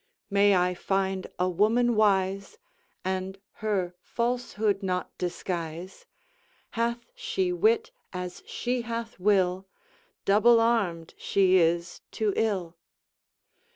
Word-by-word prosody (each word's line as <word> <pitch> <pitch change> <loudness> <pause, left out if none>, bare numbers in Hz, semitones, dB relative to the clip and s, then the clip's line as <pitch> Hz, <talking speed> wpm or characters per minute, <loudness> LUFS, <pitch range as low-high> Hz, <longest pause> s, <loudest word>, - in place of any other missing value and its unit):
May 200 0 +5
I 180 0 +2
find 190 +1 -1
a 180 - +1
woman 225 +6 +2
wise, 195 - +1 0.5
And 190 +1 -2 0.2
her 195 -5 -1
falsehood 235 -4 -1
not 180 -2 -3
disguise: 175 0 -5 0.6
Hath 235 - -2
she 445 -7 -1
wit 445 +5 +2 0.2
as 180 -1 -6
she 245 0 -2
hath 230 -2 -5
will, 190 -1 +2 0.6
Double 230 +4 +5
armed 200 -8 0
she 190 -1 +3
is 170 0 +1
to 215 -2 0
ill. 185 -6 -1
195 Hz, 105 wpm, -27 LUFS, 180-230 Hz, 0.6 s, May